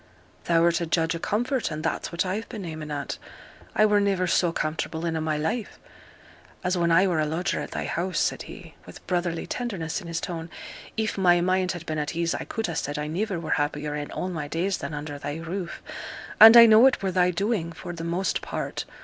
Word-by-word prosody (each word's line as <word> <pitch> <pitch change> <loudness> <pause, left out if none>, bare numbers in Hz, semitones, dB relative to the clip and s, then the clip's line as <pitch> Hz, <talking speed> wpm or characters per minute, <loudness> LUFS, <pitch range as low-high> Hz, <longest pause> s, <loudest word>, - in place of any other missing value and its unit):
'Thou'rt 170 0 +3
a 170 - -2
judge 165 0 +1
o' - - -4
comfort, 240 +7 -1
and 155 0 -5
that's 165 - -2
what 170 +2 -1
I've 200 +5 -3
been 210 -6 -6
aiming 155 -2 -6
at. 145 -2 -4 0.6
I 215 - +5
were 210 -1 +4
niver 195 -2 +1
so 175 -1 +2
comfortable 160 +1 -3
in 165 -1 -1
a' 160 - -1
my 155 -1 0
life 210 +9 -2 0.9
as 180 0 +1
when 170 -1 +1
I 175 +4 +5
were 175 -4 +1
a 155 - +2
lodger 175 +5 -1
at - - -5
thy - - -4
house,' 180 +2 -2
said - - 0
he, - - -11
with - - -12
brotherly 175 -2 -1
tenderness 200 -8 -3
in 175 - -10
his 165 -1 -2
tone. 165 -1 -5 0.5
'If 220 -2 -1
my 175 -2 +5
mind 185 +1 +1
had 175 -1 -8
been 155 -2 -2
at 150 +2 -3
ease 170 0 0
I - - -4
could 225 - -3
ha' - - -3
said 145 0 -3
I 150 - -2
niver 185 +4 -2
were 165 - -5
happier 145 0 -2
in 145 0 -4
all 185 - -3
my 155 -5 -4
days 180 +5 -1
than 150 - -5
under 145 -1 -6
thy 145 +1 -4
roof; 170 +2 -5 0.6
and 225 +2 +11
I 235 - +12
know 225 +3 +8
it 260 - 0
were 190 - 0
thy 180 0 +3
doing 190 -1 -1
for 170 +1 -7
the 165 -1 -6
most 175 +3 -1
part. - - -4
170 Hz, 225 wpm, -26 LUFS, 160-195 Hz, 0.9 s, I